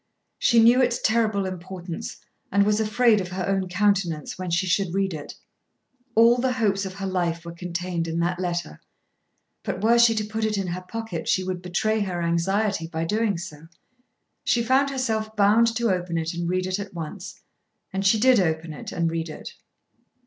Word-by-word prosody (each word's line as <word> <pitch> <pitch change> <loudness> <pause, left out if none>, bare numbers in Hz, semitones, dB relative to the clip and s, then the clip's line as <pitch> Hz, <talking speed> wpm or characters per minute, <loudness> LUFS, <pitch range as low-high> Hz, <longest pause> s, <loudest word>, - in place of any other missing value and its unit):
She 235 - +4
knew 235 +3 +6
its 245 -1 +1
terrible 215 -3 +1
importance, 185 -1 -6 0.3
and 200 +1 +4
was 210 +1 +2
afraid 220 0 +3
of 185 - -5
her 185 0 -4
own 195 -1 0
countenance 180 -5 0
when 185 -1 -5
she 175 +3 +1
should 185 0 0
read 195 -2 0
it. 150 -2 -7 0.8
All 230 +2 +6
the 255 0 +1
hopes 205 -5 0
of 190 - -9
her 195 0 -5
life 175 -3 -1
were 170 - -6
contained 170 0 -3
in 165 0 -3
that 175 +1 -1
letter. 175 - -3 0.8
But 185 - -4
were 235 +2 +5
she 235 -1 +6
to 215 - 0
put 220 +1 -4
it 215 -1 0
in 195 - -1
her 180 0 -4
pocket 190 -3 -6
she 185 - +2
would 185 -1 -4
betray 205 +5 0
her 185 -4 -2
anxiety 170 +2 0
by 165 0 -3
doing 210 +1 0
so. 165 -3 -9 0.8
She 235 - +2
found 265 +4 +3
herself 220 -5 -2
bound 210 +3 +5
to 235 -2 +1
open 175 -2 -2
it 165 +1 -2
and 170 0 -3
read 185 0 0
it 185 +2 -2
at 200 -2 -7
once, 170 +4 -7 0.5
and 195 0 -1
she 200 +3 +4
did 255 0 +5
open 160 -2 -1
it - - -8
and 170 -1 0
read 165 0 -3
it. 155 - -8
190 Hz, 190 wpm, -24 LUFS, 175-220 Hz, 0.8 s, knew